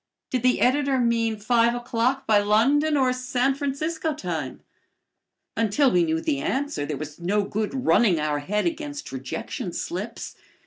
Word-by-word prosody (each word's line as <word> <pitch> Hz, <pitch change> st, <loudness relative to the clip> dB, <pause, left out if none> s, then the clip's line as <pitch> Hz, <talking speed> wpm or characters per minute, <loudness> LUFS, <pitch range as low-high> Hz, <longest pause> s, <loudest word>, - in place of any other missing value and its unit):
Did 255 Hz, -, 0 dB
the 250 Hz, +1 st, +2 dB
editor 275 Hz, +1 st, +2 dB
mean 230 Hz, -2 st, +1 dB
five 235 Hz, +2 st, +2 dB
o'clock 245 Hz, +2 st, -1 dB
by 215 Hz, -3 st, +4 dB
London 275 Hz, +9 st, +3 dB
or 260 Hz, -2 st, +3 dB
San 255 Hz, +1 st, 0 dB
Francisco 310 Hz, +3 st, -2 dB
time? 160 Hz, -, -4 dB, 0.9 s
Until 230 Hz, +5 st, +2 dB
we 175 Hz, -1 st, +3 dB
knew 160 Hz, 0 st, 0 dB
the 140 Hz, -3 st, -1 dB
answer 270 Hz, -, -2 dB
there 150 Hz, -, -3 dB
was 155 Hz, +1 st, -8 dB
no 200 Hz, +4 st, +1 dB
good 220 Hz, +6 st, -3 dB
running 190 Hz, -9 st, +4 dB
our 150 Hz, -1 st, 0 dB
head 210 Hz, +9 st, -1 dB
against 300 Hz, -3 st, -4 dB
rejection 130 Hz, -1 st, -5 dB
slips. -, -, -5 dB
235 Hz, 150 wpm, -24 LUFS, 195-270 Hz, 0.9 s, by